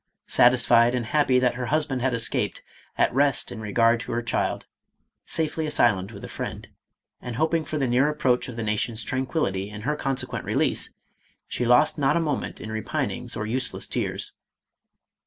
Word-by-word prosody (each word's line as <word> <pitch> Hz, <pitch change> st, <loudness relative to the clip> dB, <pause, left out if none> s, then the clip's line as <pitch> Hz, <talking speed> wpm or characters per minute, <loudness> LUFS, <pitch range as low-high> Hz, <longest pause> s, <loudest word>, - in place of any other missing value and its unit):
Satisfied 120 Hz, -1 st, +5 dB
and 120 Hz, -2 st, -2 dB
happy 135 Hz, 0 st, +2 dB
that 125 Hz, -1 st, +2 dB
her 125 Hz, 0 st, -4 dB
husband 145 Hz, -2 st, 0 dB
had 130 Hz, +1 st, +1 dB
escaped, 115 Hz, -2 st, -1 dB, 0.3 s
at -, -, +2 dB
rest 140 Hz, +1 st, +2 dB
in 115 Hz, -2 st, -7 dB
regard 115 Hz, +2 st, +2 dB
to -, -, -6 dB
her 120 Hz, 0 st, -1 dB
child, 115 Hz, -, -1 dB, 0.6 s
safely 160 Hz, -1 st, -1 dB
asylumned 105 Hz, -8 st, +2 dB
with 100 Hz, -, -11 dB
a -, -, -5 dB
friend, -, -, -6 dB, 0.5 s
and 125 Hz, -2 st, -6 dB
hoping 160 Hz, +4 st, +1 dB
for 155 Hz, +1 st, -4 dB
the 135 Hz, -, +1 dB
near 130 Hz, +4 st, +3 dB
approach 130 Hz, -5 st, +1 dB
of 125 Hz, -, -7 dB
the 115 Hz, -, -4 dB
nation's 110 Hz, +1 st, -1 dB
tranquillity 130 Hz, -, -2 dB
and 105 Hz, 0 st, -8 dB
her 150 Hz, +5 st, 0 dB
consequent 135 Hz, -3 st, -2 dB
release, -, -, 0 dB, 0.6 s
she 120 Hz, -, -2 dB
lost 125 Hz, +5 st, +4 dB
not 135 Hz, +3 st, +3 dB
a -, -, +2 dB
moment 150 Hz, -5 st, -2 dB
in 110 Hz, -, -7 dB
repinings 110 Hz, -1 st, -3 dB
or 105 Hz, -, -2 dB
useless 125 Hz, +4 st, -1 dB
tears. -, -, -3 dB
125 Hz, 175 wpm, -25 LUFS, 115-140 Hz, 0.6 s, Satisfied